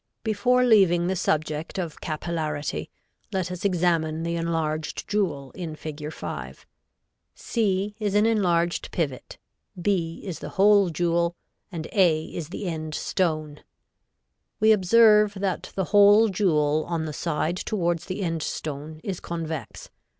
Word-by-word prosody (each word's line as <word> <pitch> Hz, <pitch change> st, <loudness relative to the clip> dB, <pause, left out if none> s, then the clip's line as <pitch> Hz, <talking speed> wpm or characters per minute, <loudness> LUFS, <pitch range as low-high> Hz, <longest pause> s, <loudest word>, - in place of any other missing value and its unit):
Before 235 Hz, +3 st, +2 dB
leaving 190 Hz, -8 st, +5 dB
the 190 Hz, +2 st, 0 dB
subject 155 Hz, -2 st, -1 dB
of 170 Hz, -5 st, -4 dB
capillarity 155 Hz, -2 st, -3 dB, 0.4 s
let 185 Hz, -2 st, -2 dB
us 180 Hz, +2 st, -6 dB
examine 165 Hz, -4 st, +1 dB
the 170 Hz, 0 st, -2 dB
enlarged 160 Hz, -2 st, -2 dB
jewel 170 Hz, -10 st, -1 dB
in 165 Hz, -4 st, -6 dB
Fig. 150 Hz, 0 st, -6 dB
5; -, -, -7 dB, 0.7 s
c 205 Hz, -2 st, -1 dB
is 205 Hz, -2 st, -1 dB
an 210 Hz, +1 st, +4 dB
enlarged 175 Hz, -6 st, +1 dB
pivot, 140 Hz, -7 st, -3 dB, 0.4 s
b 175 Hz, -3 st, -1 dB
is 185 Hz, -5 st, -5 dB
the 150 Hz, -, -6 dB
hole 200 Hz, -1 st, +5 dB
jewel 170 Hz, +1 st, 0 dB, 0.4 s
and 160 Hz, -3 st, -5 dB
a 170 Hz, -6 st, +3 dB
is 165 Hz, -3 st, -6 dB
the 195 Hz, -, -6 dB
end 155 Hz, -3 st, -4 dB
stone. 155 Hz, -5 st, -2 dB, 1.0 s
We 220 Hz, 0 st, +5 dB
observe 210 Hz, +1 st, +5 dB
that 195 Hz, -1 st, -3 dB
the 190 Hz, -, 0 dB
hole 205 Hz, +2 st, +7 dB
jewel 155 Hz, -6 st, +2 dB
on 165 Hz, -2 st, -1 dB
the 155 Hz, -, -5 dB
side 165 Hz, +2 st, -1 dB
towards 175 Hz, -5 st, -1 dB
the 195 Hz, +2 st, -4 dB
end 165 Hz, -2 st, -2 dB
stone 155 Hz, +1 st, -5 dB
is 190 Hz, -4 st, -4 dB
convex. 165 Hz, -3 st, -6 dB
170 Hz, 135 wpm, -25 LUFS, 155-200 Hz, 1.0 s, hole